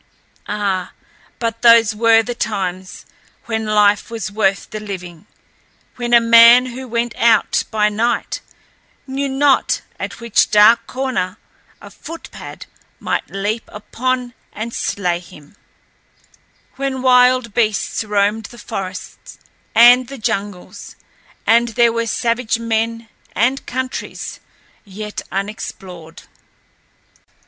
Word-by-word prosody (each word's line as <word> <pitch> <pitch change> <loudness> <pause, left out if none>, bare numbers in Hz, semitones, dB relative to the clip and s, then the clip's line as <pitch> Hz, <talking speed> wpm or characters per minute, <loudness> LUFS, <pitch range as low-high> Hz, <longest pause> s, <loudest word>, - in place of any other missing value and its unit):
Ah, 200 -3 -2 0.4
but 230 -1 -3
those 230 -2 +6
were 225 +1 +4
the 245 - -4
times 190 -5 -4 0.4
when 220 -1 -3
life 210 -1 +3
was 225 -2 -5
worth 195 -2 0
the 215 - -5
living; 185 -3 -8 0.7
when 240 -1 -4
a 240 - +7
man 235 +2 +7
who 255 +1 -7
went 235 0 -2
out 225 -3 +3
by 210 -1 +2
night 225 +3 -1 0.6
knew 275 +1 -3
not 270 0 +2 0.2
at - - -6
which 235 -2 +2
dark 210 +2 +5
corner 250 -8 -3 0.4
a - - -13
"footpad" 330 +1 -10 0.3
might - - -3
leap 205 +3 -2
upon 245 +4 -3 0.2
and 225 +2 -6
slay 180 -3 -1
him; 165 -2 -16 1.2
when 270 -1 -3
wild 250 -2 +4
beasts 215 -1 0
roamed 210 +1 0
the 240 - -11
forest 190 -3 -7 0.4
and 245 +2 +7
the 275 - -9
jungles, 200 -4 -5 0.5
and 235 +1 +4
there 235 -1 +4
were 230 0 -1
savage 230 0 0
men, 230 0 -2 0.3
and 255 +5 0
countries 255 +1 -5 0.4
yet 210 +1 -7
unexplored. 190 -4 -7
225 Hz, 115 wpm, -18 LUFS, 205-240 Hz, 1.2 s, a